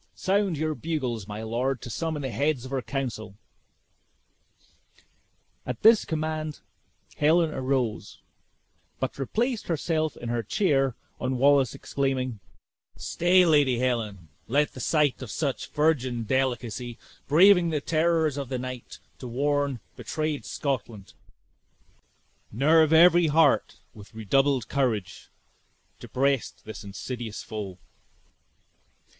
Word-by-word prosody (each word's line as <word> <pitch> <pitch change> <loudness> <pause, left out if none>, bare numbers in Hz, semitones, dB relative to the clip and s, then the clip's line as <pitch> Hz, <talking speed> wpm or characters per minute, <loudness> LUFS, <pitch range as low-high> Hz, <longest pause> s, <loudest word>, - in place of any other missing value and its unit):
Sound 195 -3 0
your 155 +1 -1
bugles, 130 -11 -3
my 105 +1 -6
lord, 120 +4 -1
to - - -7
summon 160 -1 -3
the 130 - -3
heads 140 -1 0
of 130 - -8
our 135 - 0
council." 120 -6 -4 2.3
At 125 -2 -6
this 220 0 +6
command, 155 -1 -3 0.6
Helen 160 +2 +3
arose, 130 -6 -2 0.8
but - - -3
replaced 230 - -1
herself 155 -1 -1
in 120 - -6
her 120 0 0
chair 135 - +1 0.2
on 130 0 -1
Wallace 140 -1 +4
exclaiming, 130 -4 -2 0.6
"Stay, 180 +1 +3
Lady 145 -6 +4
Helen, 110 -9 -2 0.2
let 145 +5 +1
the - - -9
sight 145 +1 +1
of 130 - -7
such 140 0 -3
virgin 130 -6 +1
delicacy, 120 -1 -2 0.3
braving 180 +3 +6
the 155 -2 0
terrors 160 -1 +1
of 140 -3 -4
the 130 - -2
night 125 -1 -7 0.2
to 125 - -7
warn 140 0 0
betrayed 155 -1 -3
Scotland, 115 -7 -4 1.4
nerve 155 +6 +4
every 170 +1 +6
heart 160 +2 +3 0.2
with 105 +1 -14
redoubled 135 +4 +1
courage 110 -9 -2 0.7
to - - -10
breast 135 -1 -1
this 110 -1 -8
insidious 110 +2 -6
foe!" 100 -4 -6
135 Hz, 115 wpm, -26 LUFS, 120-155 Hz, 2.3 s, this